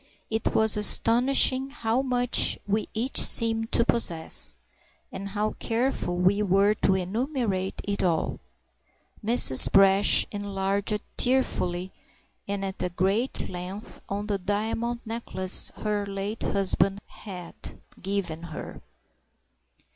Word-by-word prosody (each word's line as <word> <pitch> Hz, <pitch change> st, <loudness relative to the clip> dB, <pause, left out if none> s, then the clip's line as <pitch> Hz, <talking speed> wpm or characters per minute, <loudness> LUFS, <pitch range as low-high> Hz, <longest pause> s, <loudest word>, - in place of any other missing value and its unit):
It 220 Hz, 0 st, -2 dB
was 220 Hz, -1 st, +4 dB
astonishing 255 Hz, +5 st, +4 dB
how 235 Hz, -2 st, -1 dB
much 245 Hz, -2 st, +2 dB
we 210 Hz, +2 st, -2 dB
each 235 Hz, +5 st, -1 dB
seemed 225 Hz, -1 st, +1 dB
to 235 Hz, -, +4 dB
possess, 165 Hz, -, 0 dB, 0.6 s
and 195 Hz, +1 st, -7 dB
how 210 Hz, +2 st, -2 dB
careful 230 Hz, -6 st, -2 dB
we 190 Hz, +3 st, +2 dB
were 200 Hz, +1 st, +3 dB
to 195 Hz, -2 st, +1 dB
enumerate 200 Hz, 0 st, -2 dB
it 200 Hz, 0 st, -3 dB
all. 170 Hz, -3 st, -1 dB, 0.8 s
Mrs. 210 Hz, -, +7 dB
Brash 195 Hz, +1 st, +5 dB
enlarged 200 Hz, 0 st, -3 dB
tearfully 185 Hz, -8 st, 0 dB, 0.6 s
and 200 Hz, -1 st, -3 dB
at 180 Hz, -2 st, -4 dB
great 200 Hz, +8 st, -1 dB
length 185 Hz, +4 st, -8 dB
on 200 Hz, +1 st, -3 dB
the 205 Hz, -2 st, -2 dB
diamond 220 Hz, +5 st, -2 dB
necklace 220 Hz, -5 st, -1 dB
her 210 Hz, -1 st, -2 dB
late 200 Hz, +2 st, -5 dB
husband 195 Hz, 0 st, 0 dB
had 180 Hz, -5 st, -10 dB, 0.5 s
given 185 Hz, -4 st, -3 dB
her. 165 Hz, -2 st, -9 dB
205 Hz, 110 wpm, -26 LUFS, 190-225 Hz, 0.8 s, Mrs